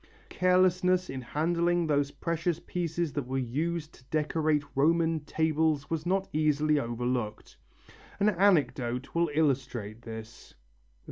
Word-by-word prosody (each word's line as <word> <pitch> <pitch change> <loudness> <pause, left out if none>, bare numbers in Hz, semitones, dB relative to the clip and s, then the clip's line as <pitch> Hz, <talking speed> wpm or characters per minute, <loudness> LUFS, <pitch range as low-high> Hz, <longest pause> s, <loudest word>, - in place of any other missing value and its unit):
Carelessness 185 -1 +2
in 135 -1 -5
handling 170 +6 +1
these 145 -2 +1
precious 170 +3 -2
pieces 170 -2 -3
that 140 -4 -3
were 135 +1 -2
used 155 +6 -2
to - - -18
decorate 155 +1 0
Roman 165 +3 +2
tables 155 -1 0
was 165 +1 -2
not 190 +1 +1
easily 150 0 +2
overlooked. 120 -3 -3 0.6
An 205 +1 +4
anecdote 140 - +1
will 170 -1 +2
illustrate 125 -8 -1
this. 110 -1 -10
155 Hz, 120 wpm, -29 LUFS, 135-170 Hz, 0.6 s, An